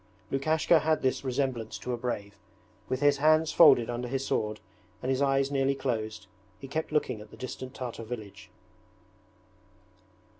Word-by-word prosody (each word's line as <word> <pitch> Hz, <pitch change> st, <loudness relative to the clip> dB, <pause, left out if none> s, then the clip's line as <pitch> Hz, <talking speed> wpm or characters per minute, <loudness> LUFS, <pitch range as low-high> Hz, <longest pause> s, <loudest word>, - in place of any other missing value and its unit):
Lukashka 155 Hz, +4 st, +3 dB
had 155 Hz, +1 st, +1 dB
this 130 Hz, +1 st, 0 dB
resemblance 130 Hz, -4 st, -2 dB
to 125 Hz, -, -4 dB
a -, -, +1 dB
brave. 110 Hz, -4 st, -4 dB, 0.6 s
With 130 Hz, +1 st, -1 dB
his 145 Hz, -1 st, +4 dB
hands 155 Hz, +2 st, +4 dB
folded 125 Hz, -8 st, +7 dB
under 120 Hz, +1 st, -3 dB
his 135 Hz, +2 st, -2 dB
sword, 105 Hz, -3 st, -1 dB, 0.4 s
and 130 Hz, -, -2 dB
his 130 Hz, +1 st, 0 dB
eyes 135 Hz, 0 st, +2 dB
nearly 135 Hz, 0 st, +1 dB
closed, 110 Hz, -5 st, -3 dB, 0.3 s
he 135 Hz, -, -8 dB
kept 155 Hz, +4 st, -3 dB
looking 150 Hz, -8 st, 0 dB
at 105 Hz, -, -12 dB
the -, -, -14 dB
distant 130 Hz, +1 st, -7 dB
Tartar 120 Hz, -2 st, -5 dB
village. 110 Hz, -3 st, -8 dB
130 Hz, 155 wpm, -29 LUFS, 120-140 Hz, 0.6 s, folded